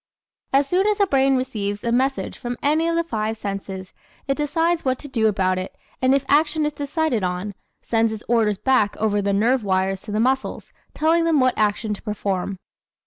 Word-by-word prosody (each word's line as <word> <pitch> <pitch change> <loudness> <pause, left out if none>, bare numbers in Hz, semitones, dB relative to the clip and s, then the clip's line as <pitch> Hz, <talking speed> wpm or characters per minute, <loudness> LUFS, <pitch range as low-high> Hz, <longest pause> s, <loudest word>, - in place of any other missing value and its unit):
As 275 +1 +3
soon 370 +6 +2
as 420 -1 +2
the 405 - +4
brain 270 -5 +3
receives 210 -6 -3
a 235 - 0
message 265 +3 0
from 245 -1 -5
any 310 +3 +2
of 335 - 0
the 335 - +2
five 220 -8 -2
senses 195 -2 -6 0.3
it 275 - +2
decides 325 +3 0
what 260 -1 0
to 290 - -9
do 230 -5 +1
about 185 -3 +1
it 185 - -6 0.3
and 260 +1 +4
if 275 -1 0
action 300 +1 +3
is 300 - -1
decided 290 -4 -1
on, 180 +3 -2 0.3
sends 225 -1 +1
its 220 -1 -6
orders 220 -4 +2
back 225 -3 +2
over 205 -1 +1
the 200 0 0
nerve 230 +5 +2
wires 190 0 0
to 210 - -8
the 210 - 0
muscles 265 +3 -1 0.2
telling 325 +2 +3
them 330 -3 +3
what 255 -1 +3
action 215 0 0
to 205 - -8
perform. 200 -2 -3
240 Hz, 200 wpm, -22 LUFS, 205-285 Hz, 0.3 s, the